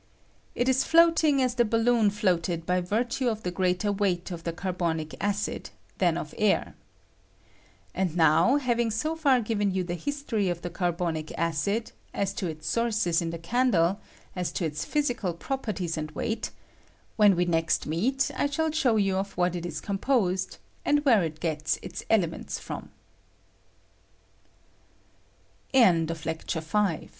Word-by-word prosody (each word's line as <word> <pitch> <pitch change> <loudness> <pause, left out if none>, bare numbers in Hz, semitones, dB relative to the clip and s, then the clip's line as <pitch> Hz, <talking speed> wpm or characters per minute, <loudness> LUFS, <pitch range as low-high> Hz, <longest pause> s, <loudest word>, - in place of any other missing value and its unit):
] - - -36
It 245 - 0
is 260 0 +3
floating 325 -4 +4
as 250 -1 +1
the 240 -1 +3
balloon 230 -1 +3
floated 175 -5 0
by 180 +1 +1
virtue 240 +7 -1
of 220 -1 -4
the 180 - -2
greater 185 +2 0
weight 195 -3 -1
of 170 -1 -7
the 170 - -1
carbonic 170 -3 -2
acid 205 +1 -2 0.3
than - - +2
of - - -5
the - - -13
air. - - +2 1.2
And 180 -3 -1
now, 160 - +5
having 240 -4 +1
so 305 +9 -1
far 275 -6 +3
given 210 -2 0
you 185 -1 -1
ttjie 175 0 -3
history 280 -9 -1
of 175 -1 -3
the 175 - -4
carbonic 170 -3 -2
acid, 170 +8 -1 0.2
as 195 -1 -1
to 190 - -3
its 155 -1 -6
sources 215 -4 +1
in" 165 - -2
the 170 - -4
candle, 195 -1 +2 0.4
as 180 -2 -2
to 175 - -1
ite 155 -1 -4
physical 240 - -1
properties 190 -7 -3
and 155 0 -3
weight, 225 +5 -2 0.7
when 205 -3 +5
we 175 +1 +2
next 165 -1 +1
meet 250 - 0
I - - +1
shall 320 +2 -1
show 280 -7 +2
you 195 -3 +2
of 195 +1 -3
what 180 0 +1
it 175 0 -4
is 155 -3 -5
composed, 195 - 0 0.3
and 290 0 +2
where 230 -7 +5
it 160 -2 -3
gets 155 -2 -1
195 Hz, 145 wpm, -27 LUFS, 170-240 Hz, 1.2 s, now